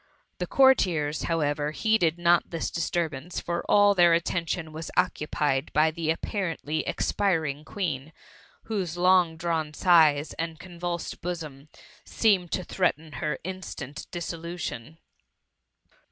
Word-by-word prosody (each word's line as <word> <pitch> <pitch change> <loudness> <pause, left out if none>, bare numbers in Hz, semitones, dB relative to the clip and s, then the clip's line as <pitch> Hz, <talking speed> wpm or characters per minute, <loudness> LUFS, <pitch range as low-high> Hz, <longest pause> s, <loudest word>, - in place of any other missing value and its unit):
The - - -2
courtiers, 175 - +3
however, 150 -3 0
heeded 175 -1 +1
not 175 0 +3
this 165 -2 -3
disturbance; 165 -1 -2
for 170 0 -3
all 205 0 +6
their 175 -3 +5
attention 170 -1 -2
was 160 +1 -6
occu 180 -4 +1
pied 140 -1 0
by 155 +1 +4
the 160 -1 -3
apparently 165 -3 -2
expiring 160 -7 0
Queen, 155 -7 -4 0.5
whose 190 -7 -3
long 180 -2 +4
drawn 160 -2 -2
sighs, 160 -5 +4
and 165 -1 -3
convulsed 175 0 -5
bosom, 155 -5 -6 0.3
seemed 190 -6 +1
to 185 - -1
threaten 160 -4 -1
her 150 0 -3
instant 155 -6 -7
dissolution. 170 -5 -6
165 Hz, 120 wpm, -27 LUFS, 155-180 Hz, 0.5 s, all